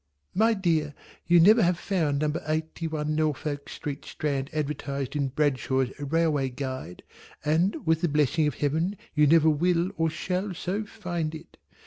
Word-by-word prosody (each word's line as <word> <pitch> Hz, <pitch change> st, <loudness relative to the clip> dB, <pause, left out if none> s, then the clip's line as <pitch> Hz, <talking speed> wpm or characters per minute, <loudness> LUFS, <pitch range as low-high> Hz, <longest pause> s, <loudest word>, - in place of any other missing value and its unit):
My 225 Hz, +3 st, +3 dB
dear, 160 Hz, -6 st, 0 dB, 0.3 s
you 175 Hz, 0 st, +6 dB
never 215 Hz, +7 st, +7 dB
have 175 Hz, -2 st, +3 dB
found 165 Hz, -7 st, 0 dB
Number 150 Hz, +1 st, 0 dB
Eighty 160 Hz, +1 st, -2 dB
one 155 Hz, -1 st, -2 dB
Norfolk 150 Hz, -2 st, -2 dB
Street 145 Hz, -2 st, -6 dB
Strand 140 Hz, -2 st, -3 dB
advertised 140 Hz, -2 st, -3 dB
in 140 Hz, -2 st, +1 dB
Bradshaw's 130 Hz, -2 st, 0 dB
Railway 145 Hz, -2 st, +1 dB
Guide, 130 Hz, -8 st, -6 dB, 0.4 s
and 165 Hz, +7 st, +1 dB
with 160 Hz, 0 st, +2 dB
the 175 Hz, -, +2 dB
blessing 150 Hz, +1 st, +2 dB
of 150 Hz, -, -2 dB
Heaven 160 Hz, +7 st, 0 dB, 0.2 s
you 150 Hz, -1 st, +4 dB
never 160 Hz, +1 st, +5 dB
will 175 Hz, +4 st, +1 dB
or 165 Hz, 0 st, +2 dB
shall 185 Hz, +4 st, -3 dB
so 195 Hz, +5 st, -3 dB
find 170 Hz, -5 st, -4 dB
it. 155 Hz, -, -12 dB
155 Hz, 155 wpm, -27 LUFS, 145-170 Hz, 0.4 s, never